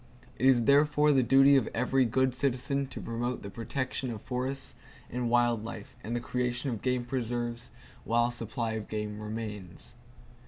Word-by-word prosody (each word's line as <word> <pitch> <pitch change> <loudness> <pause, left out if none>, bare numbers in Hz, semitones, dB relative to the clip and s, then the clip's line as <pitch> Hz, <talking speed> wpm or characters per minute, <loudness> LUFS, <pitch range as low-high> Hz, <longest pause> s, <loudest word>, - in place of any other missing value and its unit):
It 130 - +4
is 125 -3 +5
therefore 150 +3 +5
the 135 -2 +5
duty 135 +3 +6
of 130 - +1
every 130 +2 +2
good 130 +2 +2
citizen 135 +1 0
to 130 - -8
promote 120 +2 -3
the 100 - -7
protection 130 +3 -3
of 115 -3 -4
forests 130 +4 -3 0.4
and 125 0 -1
wild 120 -2 +3
life 110 -2 -8
and 115 +3 -3
the - - 0
creation 125 +3 -2
of 115 - -4
game 125 -1 0
preserves, 120 -1 -3 0.3
while 120 +1 +2
a - - -4
supply 115 0 -3
of 110 -1 -4
game 105 -1 -4
remains. 105 -4 -6
120 Hz, 170 wpm, -30 LUFS, 115-130 Hz, 0.4 s, duty